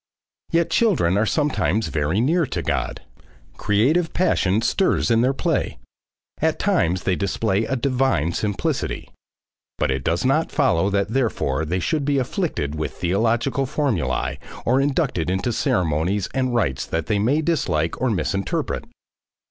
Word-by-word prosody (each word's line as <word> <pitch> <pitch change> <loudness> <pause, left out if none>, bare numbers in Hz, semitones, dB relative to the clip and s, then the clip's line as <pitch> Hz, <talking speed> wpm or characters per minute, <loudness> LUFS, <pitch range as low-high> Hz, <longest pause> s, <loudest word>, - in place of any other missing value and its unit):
Yet 170 -1 +1
children 160 - +2
are 105 +2 +2
sometimes 110 - 0
very 80 +5 0
near 160 +6 +2
to - - -3
God. - - -2 0.6
Creative 140 +12 +2
passion 110 - +2
stirs 190 -7 +1
in 115 0 +4
their 130 +2 +3
play. 135 - -1 0.6
At - - +1
times 90 +2 +1
they 95 - +1
display 100 +2 0
a 130 - -1
divine 130 - +1
simplicity. 100 - -2 0.7
But - - 0
it 65 -1 -2
does 85 - 0
not 145 +5 +2
follow 100 - +2
that 100 0 0
therefore 110 - 0
they 90 +4 -1
should 150 - -1
be 140 0 +1
afflicted 125 - -2
with 75 0 -3
theological 115 +9 0
formulae 75 - -1 0.3
or 130 +3 +3
inducted 140 - 0
into 95 +6 -1
ceremonies 90 +2 0
and 130 -2 0
rites 70 - 0
that 80 0 -2
they 105 -2 0
may 140 +9 +2
dislike 85 - 0
or 130 - +2
misinterpret. 100 0 -2
110 Hz, 145 wpm, -22 LUFS, 85-135 Hz, 0.7 s, in